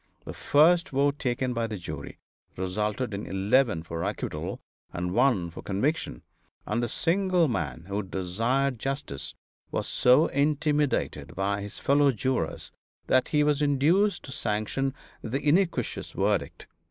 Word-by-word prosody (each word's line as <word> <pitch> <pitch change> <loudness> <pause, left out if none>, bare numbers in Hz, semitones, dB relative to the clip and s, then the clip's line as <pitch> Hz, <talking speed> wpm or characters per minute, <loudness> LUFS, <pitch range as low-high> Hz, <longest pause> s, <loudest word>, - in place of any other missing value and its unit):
The - - -6
first 170 +4 +4
vote 140 +1 +1
taken 125 -1 -1
by 115 -1 -1
the 110 -2 -5
jury 75 -5 -7 0.4
resulted 105 +5 -2
in 100 +1 -5
eleven 105 -1 +2
for 85 0 -5
acquittal - - -4 0.3
and 90 +1 -3
one 115 -8 +2
for - - -9
conviction, 105 - -2 0.4
and 120 - -1
the 120 - -1
single 180 - +2
man 80 - -3
who 100 +1 -2
desired 115 +8 -1
justice 135 - -4 0.3
was - - -2
so 130 +6 +5
intimidated 145 - 0
by 100 +1 -1
his 100 0 -7
fellow 140 0 +3
jurors 130 +2 -2 0.3
that 130 -1 +3
he 150 -1 +2
was 150 -1 +2
induced 160 +8 +2
to 135 - -9
sanction 120 +4 -2 0.3
the 130 +5 -2
iniquitous 175 +4 +1
verdict. - - -1
125 Hz, 140 wpm, -27 LUFS, 100-145 Hz, 0.4 s, so